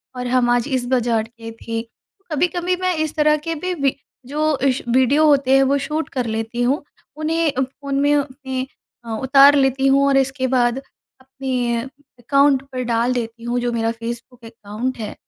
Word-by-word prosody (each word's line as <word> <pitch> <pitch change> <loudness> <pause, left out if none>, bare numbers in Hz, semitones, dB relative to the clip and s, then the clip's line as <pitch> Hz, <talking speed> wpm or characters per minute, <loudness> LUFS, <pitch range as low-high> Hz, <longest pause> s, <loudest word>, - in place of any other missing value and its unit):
और 250 0 -4
हम 245 -1 +2
आज 245 +2 +2
इस 260 -3 -1
बाज़ार 240 -3 +1
के 225 0 -10
थे। 230 0 -3
तो 385 - -34
कभी-कभी 355 +3 0
मैं 365 -1 +1
इस 315 -1 -2
तरह 300 0 +3
के 330 - -1
भी 365 +4 -3
वि 275 -1 +2 0.3
जो 300 +2 0
इस 260 0 0
वीडियो 260 +5 +4
होते 280 -3 +3
हैं, 270 - +5
वो 275 +1 +2
शूट 305 +3 -3
कर 255 -2 -2
लेती 225 +2 -3
हूँ, 265 +5 +1 0.3
उन्हें 315 0 0
अ, 265 -1 -2
फ़ोन 275 +1 -3
में 290 +1 +3
अपने 265 -2 -3 0.4
अ, - - -9
उतार 275 +2 +6
लेती 270 0 +2
हूँ 275 +1 +4
और 275 -1 +3
इसके 265 0 0
बाद 245 -1 +2 0.4
अपने 255 -3 -2 0.4
अकाउंट 275 +2 +3
पे 255 -1 -3
डाल 235 +1 +1
देती 230 -1 -5
हूँ, 240 +1 -1
जो 245 0 -1
मेरा 230 -1 0
फेसबुक 235 +1 -8
अकाउंट 225 +3 -5
है, 215 -2 -5
260 Hz, 190 wpm, -20 LUFS, 240-285 Hz, 0.4 s, उतार